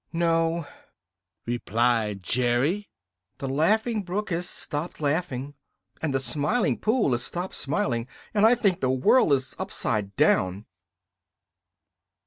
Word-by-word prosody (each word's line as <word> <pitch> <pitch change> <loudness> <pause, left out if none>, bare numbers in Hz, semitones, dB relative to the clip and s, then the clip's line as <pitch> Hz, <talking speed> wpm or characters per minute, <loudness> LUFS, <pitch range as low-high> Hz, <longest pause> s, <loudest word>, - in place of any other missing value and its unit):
"No," 165 -1 +1 0.8
replied 115 -3 0
Jerry, 125 - +1 0.5
"the 135 - -4
Laughing 210 - +1
Brook 195 +2 -4
has 175 +2 -1
stopped 150 +4 -3
laughing, 145 -3 -1 0.5
and 155 - -1
the 135 - +1
Smiling 150 - 0
Pool 220 - +2
has 120 0 0
stopped 175 +8 -4
smiling, 125 -4 -1 0.3
and 205 -1 +2
I 225 +3 +7
think 195 -6 +1
the 130 - +1
world 130 - +4
is 130 -2 +1
upside 105 -4 -2
down." 95 +3 +2
145 Hz, 115 wpm, -26 LUFS, 120-180 Hz, 0.8 s, I